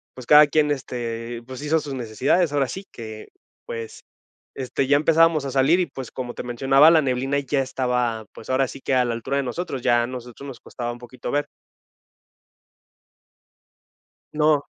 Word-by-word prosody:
pues, 130 - -10
cada 150 +3 +8
quien, 150 0 +2
este, 120 -3 -4
pues, 130 +1 -8
hizo 155 +2 +1
sus 145 -2 -6
necesidades, 130 +7 +1
ahora 140 -2 +2
sí 190 +1 -6
que, 110 -2 -9 0.4
pues, 115 -1 -7 0.5
este, 130 0 -2
ya 140 - +5
empezábamos 160 0 +3
a 135 - -3
salir 140 +6 +4
y, 180 - +1
pues, 130 -6 -8
como 125 -2 -5
te - - -5
mencionaba, 135 +5 +4
la 160 -2 +5
neblina 135 +1 0
ya 140 0 0
estaba, 125 -3 -1
pues, - - -13
ahora 130 +1 +2
sí 135 - -9
que 135 - -1
a 125 -1 +3
la 120 - -1
altura 125 +4 -3
de 140 - +1
nosotros, 135 +2 -4
ya 120 -1 +3
a - - -1
nosotros 125 +1 -9
nos 135 -3 -9
costaba 120 -1 -5
un 120 - -10
poquito 120 +1 -8
ver. 145 +2 0 2.9
No. 150 -1 +2
130 Hz, 180 wpm, -23 LUFS, 120-145 Hz, 2.9 s, cada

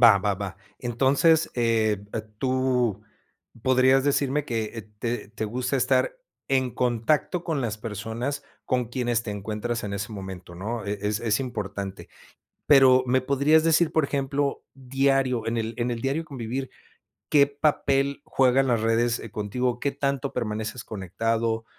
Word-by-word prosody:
Va, 115 -5 +8
va, 100 0 0
va. 95 -1 -5 0.2
Entonces, 135 +7 +3
eh, 110 -4 +1 0.3
tú 130 -5 +1 0.6
podrías 130 +1 +4
decirme 145 0 +1
que, 115 -4 -1
eh, 115 - -5 0.2
te 120 -3 -3
te 110 0 -4
gusta 125 +5 -1
estar - - +2 0.3
en 130 -2 +2
contacto 125 +8 0
con 160 -5 -1
las 110 -3 -2
personas 115 +6 -4 0.2
con 125 -2 0
quienes 120 -1 -1
te 105 - -4
encuentras 110 +4 -3
en 100 - -4
ese 100 +2 -4
momento, 95 -3 -8
¿no? 105 +4 -4
E 100 0 -3
es 105 +1 0
es 110 +1 +1
importante. 100 -6 -5 0.6
Pero, 130 -2 +7
¿me 130 +1 +3
podrías 140 +4 +3
decir, 165 0 +3
por 160 -2 +3
ejemplo, 140 0 -1
diario, 135 -2 +1
en 115 +1 -1
el 115 0 -3
en 120 +1 -1
el 115 - -3
diario 140 +6 -1
convivir, 130 -1 -5 0.6
qué 145 -2 +6
papel 140 -1 +1
juegan 135 0 +3
las 115 -3 +2
redes, 115 +1 +2
eh, 115 - -8
contigo, 120 +4 -2
qué 140 - 0
tanto 140 -1 -2
permaneces 110 0 -3
conectado, 115 +3 -2
120 Hz, 150 wpm, -25 LUFS, 110-135 Hz, 0.6 s, Va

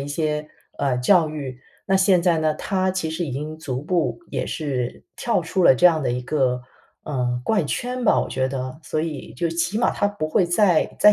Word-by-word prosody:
一 140 - -5
些， 150 0 -2 0.3
呃， 135 -3 +1
教 160 +5 +4
育。 135 -4 -6 0.2
那 195 - +1
现 190 -2 +4
在 170 -2 +3
呢， 155 -1 +1
他 185 +2 0
其 180 -4 -2
实 170 +1 -2
已 145 - -5
经 155 +3 -5
逐 135 -4 -4
步， 150 -9 0
也 - - -2
是 130 -6 -3
跳 230 -7 0
出 185 +3 -1
了 135 - +7
这 175 - -1
样 160 -3 +3
的 125 - 0
一 125 +1 -2
个， 125 -3 0 0.4
呃， 125 -4 -1
怪 210 -5 +2
圈 250 - -3
吧， 225 - +4
我 - - -2
觉 130 0 0
得， 130 +2 -5
所 155 - -3
以 155 -7 -6
就 165 +6 -1
起 170 +4 -1
码 235 - +2
他 205 - 0
不 205 -6 -3
会 175 +3 +2
再 175 -2 +2
再 210 - +7
155 Hz, 230 characters per minute, -23 LUFS, 135-180 Hz, 0.4 s, 了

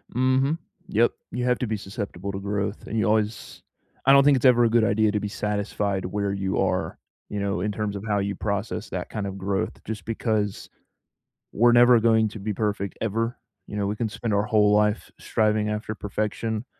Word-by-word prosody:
Mhm. 130 +4 +2 0.3
Yep. 115 +3 +3 0.2
You 125 0 -2
have 125 -1 +2
to 125 - -1
be 110 - -1
susceptible 100 -1 -5
to 95 - -5
growth, 100 +1 -3
and 115 - -3
you 110 - +2
always 110 0 -1 0.4
I 135 - +7
don't 140 0 +7
think 140 -2 +5
it's 125 - -2
ever 120 -2 +6
a 115 - +4
good 115 0 +3
idea 105 +1 +2
to 105 - 0
be 105 - -3
satisfied 100 -2 -2
where 100 +1 -1
you 95 -1 -2
are, - - 0 0.3
you 105 - -3
know, 100 -2 -1
in 105 - -1
terms 105 0 -3
of 100 - -6
how 105 -1 +1
you 100 +1 -1
process 100 +1 -3
that - - -4
kind 105 -2 -3
of 100 0 -6
growth 95 0 -2
just 105 -4 -6
because 110 -3 -2 0.8
we're 120 +3 +5
never 120 0 +7
going 110 -1 +4
to 110 - -9
be 105 +2 -3
perfect 100 -2 -2
ever. 115 +2 -1 0.3
You 105 - -6
know, 100 -1 0
we 105 - -2
can 110 0 -2
spend 115 0 -3
our 100 +1 +2
whole 105 -1 +3
life 105 +1 +2
striving 105 -1 +1
after 105 0 -3
perfection. 110 +2 -3
105 Hz, 205 wpm, -25 LUFS, 100-115 Hz, 0.8 s, I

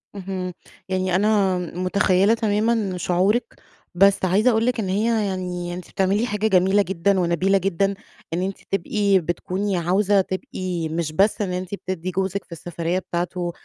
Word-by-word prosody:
اهم، 185 -2 -4 0.4
يعني 185 -1 0
أنا 200 -2 +2
متخيّلة 185 +3 +2
تمامًا 215 -2 0
شعورِك، 185 +7 +1 0.4
بس 195 +1 +4
عايزة 205 +7 +3
أقول 225 0 +1
لِك 250 -1 0
إن 195 -4 -2
هي 215 +2 +1
يعني 180 -2 -3
أنتِ 180 0 -8
بتعملي 195 +4 +1
حاجة 215 -2 0
جميلة 190 0 +4
جدًا 190 +1 +1
ونبيلة 180 +3 +2
جدًا، 195 +1 0 0.4
إن 175 - 0
أنتِ 190 +1 -3
تبقي 200 +1 +2
بتكوني 185 +3 -2
عاوزة 195 +3 +2
تبقي 185 -3 -4
مش 160 -1 -2
بس 200 +7 +2
إن 185 -3 -1
أنتِ 185 +2 -4
بتدّي 185 -2 -4
جوزِك 190 +1 -2
في - - -34
السفرية 170 +2 -3
بتاعته 175 0 -3
190 Hz, 155 wpm, -22 LUFS, 180-200 Hz, 0.4 s, بس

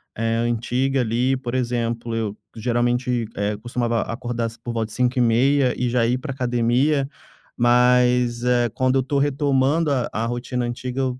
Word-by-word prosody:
eh, 115 +1 0
antiga, 120 +3 0
ali, 125 +3 +1
por 125 -2 -5
exemplo 120 -2 -2
eu 110 -2 -3 0.2
geralmente, 120 +1 0
eh, 100 +1 -1
costumava 120 0 -1
acordar 120 0 -3
às 115 - -5
por 120 0 -6
volta 115 -1 -1
de 110 - -11
5h30 125 +2 +2
e 125 - 0
já 120 -1 +2
ir 125 +2 +1
pra 135 +3 -6
academia, 130 +3 +1 0.5
mas 125 0 +3
eh, 120 -1 +2
quando 130 0 +1
eu - - 0
tô 140 +2 0
retomando 145 +2 +1
a 130 -4 0
a 110 +2 -1
rotina 120 +1 -3
antiga 125 +2 -4
eu, 130 -1 -2
125 Hz, 165 wpm, -22 LUFS, 115-130 Hz, 0.5 s, mas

